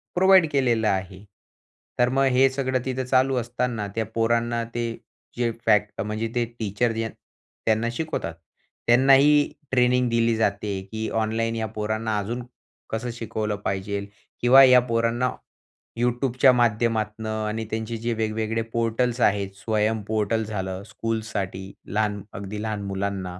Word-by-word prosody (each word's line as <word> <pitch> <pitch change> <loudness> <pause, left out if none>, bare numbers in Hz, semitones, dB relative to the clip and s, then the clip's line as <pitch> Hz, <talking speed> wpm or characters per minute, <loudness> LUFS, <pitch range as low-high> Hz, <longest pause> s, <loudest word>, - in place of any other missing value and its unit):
Provide 190 -1 +6
केलेलं 120 -6 +2
आहे. 95 -1 -2 0.8
तर 125 - +4
मग 135 0 +4
हे 135 +1 +5
सगळं 130 -1 -1
तिथं 130 0 -2
चालू 130 +1 +2
असताना 120 -2 -2
त्या 110 -1 0
पोरांना 115 +1 +1
ते 120 - 0 0.5
जे 120 -1 +1
फॅक्ट 105 -2 +2
म्हणजे 110 +2 -2
ते 120 - +2 0.2
टीचर 110 +2 0
जे 115 0 -2
त्यांना 110 +1 -4
शिकवतात. 140 - -3 0.5
त्यांनाही 135 +4 +5 0.2
ट्रेनिंग 125 -1 +3
दिली 115 0 +2
जाते 100 -2 -1
की 110 0 -3
ऑनलाईन 115 +1 -1
या 110 -1 -2
पोरांना 110 +1 -1
अजून 120 +5 -4 0.5
कसं 120 +2 -3
शिकवलं 110 -2 -3
पाहिजेल 100 +1 -2 0.3
किंवा 130 +3 +8
या 125 -1 +8
पोरांना 115 +2 +1 0.7
YouTubeच्या 125 +2 +3
माध्यमातनं 110 -2 0
आणि 110 +1 -3
त्यांचे 110 +1 -3
जे 115 +1 -2
वेगवेगळे 110 0 -1
पोर्टल्स 115 +1 0
आहेत, 100 -3 +2
स्वयं 110 +1 0
पोर्टल 110 +1 0
झालं 95 -2 -4
स्कूलसाठी 105 -4 -4 0.2
लहान 105 0 -1
अगदी 100 +2 -6
लहान 110 -2 -3
मुलांना. 95 -2 -3
115 Hz, 135 wpm, -24 LUFS, 105-120 Hz, 0.8 s, किंवा